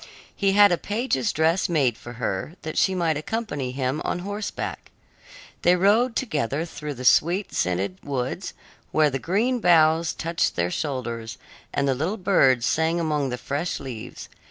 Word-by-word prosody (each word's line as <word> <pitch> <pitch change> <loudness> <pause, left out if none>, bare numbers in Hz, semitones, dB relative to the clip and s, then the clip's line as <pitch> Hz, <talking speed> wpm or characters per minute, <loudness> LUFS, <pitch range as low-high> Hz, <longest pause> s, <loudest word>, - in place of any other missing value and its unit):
He 195 -1 +1
had 205 -1 +7
a 175 - +1
page's 210 - -1
dress 160 +4 +1
made 140 -9 +2
for 120 - -10
her, 115 - -3
that 155 - -5
she 190 - +2
might 165 -4 +1
accompany 150 - -3
him 130 +3 -2
on - - -1
horseback. 205 +1 -5 0.7
They 175 +1 +5
rode 220 +7 +3
together 155 - -1
through 150 -3 -6
the 125 +1 -7
sweet 175 +10 +3
scented 90 +1 -1
woods, 140 +6 -3 0.4
where 155 -2 +3
the 135 - -2
green 225 - 0
boughs 165 -3 +4
touched 165 +1 -1
their 85 0 0
shoulders, 120 - -4 0.3
and 140 0 0
the 135 - +3
little 160 - -2
birds 135 - +3
sang 160 +2 +1
among 150 -4 0
the 125 - -3
fresh 140 +7 -3
leaves. 125 -5 -8
155 Hz, 160 wpm, -24 LUFS, 130-185 Hz, 0.7 s, had